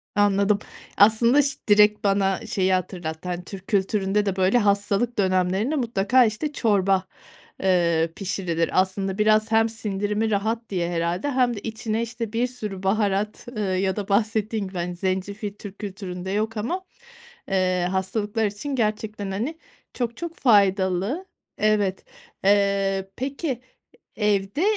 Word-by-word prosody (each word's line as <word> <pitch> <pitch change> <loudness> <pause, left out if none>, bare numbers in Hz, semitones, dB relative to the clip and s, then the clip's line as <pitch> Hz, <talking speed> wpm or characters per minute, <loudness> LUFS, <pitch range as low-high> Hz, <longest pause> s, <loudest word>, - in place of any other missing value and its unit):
Anladım, 205 0 +3 0.4
aslında 230 +7 +5
ş 275 -1 -2
direkt 210 0 +5
bana 195 0 +1
şeyi 190 -3 +1
hatırlattı. 175 -2 -3
Hani 175 0 -3
Türk 195 +1 -10
kültüründe 200 0 +1
de 195 -2 -1
böyle 190 +4 +3
hastalık 205 +2 +1
dönemlerinde 190 +7 +1
mutlaka, 240 -1 +3
işte, 230 +8 -2
çorba, 195 -5 +2 0.6
ııı, 170 -3 +2
pişirilir. 175 -4 -1
Aslında 190 +1 -3
biraz 215 +1 +3
hem 225 0 +4
sindirimi 210 0 -2
rahat 220 +3 -1
diye 175 -3 -1
herhâlde 175 +11 -1
hem 250 -2 +2
de 205 - -5
içine, 220 0 -3
işte, 230 -1 -5
bir 240 +2 +1
sürü 210 -6 -7
baharat, 205 +1 0
ııı, 210 -6 -2
ya 190 0 0
da 205 -1 -5
bahsettiğin 215 0 0
gibi, 185 -1 -8
hani, 175 0 -3
zencefil 195 +3 -3
Türk 205 -1 -11
kültüründe 190 -2 -6
yok 220 +2 -1
ama, 295 - -2 0.7
eee, 185 -2 +1
hastalıklar 205 +3 -1
için 210 +8 -4
gerçekten, 215 -3 -2
hani, 240 +12 -3 0.4
çok 235 -2 -2
çok 340 -1 -6
faydalı. 200 - +2 0.3
Evet. 205 -3 +1 0.4
Iıı, 195 -1 +2
peki 270 0 -3 0.6
evde 205 - 0
205 Hz, 135 wpm, -24 LUFS, 190-225 Hz, 0.7 s, aslında